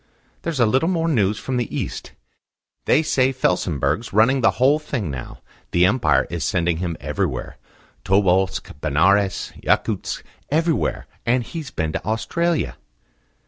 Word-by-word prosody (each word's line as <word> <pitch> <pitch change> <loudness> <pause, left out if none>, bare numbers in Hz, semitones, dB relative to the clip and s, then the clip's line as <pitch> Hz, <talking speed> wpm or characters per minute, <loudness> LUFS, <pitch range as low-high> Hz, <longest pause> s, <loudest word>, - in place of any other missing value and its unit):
"There's 165 -5 -3
a 120 - +5
little 130 +9 +2
more 165 -3 0
news 105 -9 +2
from 125 +6 -3
the 120 - -1
East. - - -5 0.7
They 155 - +4
say 130 -3 +2
Felsenburgh's 90 - 0
running 115 +6 +4
the - - +5
whole 140 +4 +4
thing 120 - -3
now. 65 -2 -8 0.3
The 85 +1 +4
Empire 100 - +3
is 85 -3 -3
sending 85 -1 +1
him 85 -1 -3
everywhere - - -3 0.5
Tobolsk, 95 -1 +2
Benares, 95 +6 +2
Yakutsk - - 0 0.3
everywhere; 160 +2 0 0.2
and 120 +1 +2
he's 155 +2 -7
been 80 -8 -2
to - - -4
Australia." 170 +9 -1
110 Hz, 140 wpm, -22 LUFS, 90-135 Hz, 0.7 s, a